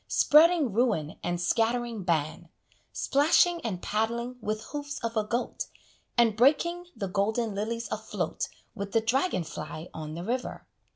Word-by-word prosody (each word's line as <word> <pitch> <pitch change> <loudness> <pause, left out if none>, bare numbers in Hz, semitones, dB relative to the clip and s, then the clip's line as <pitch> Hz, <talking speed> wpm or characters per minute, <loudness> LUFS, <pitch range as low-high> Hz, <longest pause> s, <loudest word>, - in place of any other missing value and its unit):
Spreading 310 - +5
ruin 205 -10 0
and 175 0 -1
scattering 230 +4 0
ban, 165 0 -1 0.4
Splashing 330 +4 +3
and 190 -6 -4
paddling 235 +3 -1
with 215 0 -2
hoofs 290 -1 -4
of 230 0 -2
a 215 - +2
goat, 235 +4 -2 0.5
And 230 -3 +4
breaking 340 +9 +3
the 205 -4 -3
golden 210 +4 0
lilies 230 +4 -3
afloat - - -3 0.2
With 200 -2 -6
the 225 - +4
dragon 245 - +1
fly 155 +1 -7
on 155 -1 -6
the 170 - -5
river. 250 +5 -3
225 Hz, 140 wpm, -28 LUFS, 195-255 Hz, 0.5 s, Spreading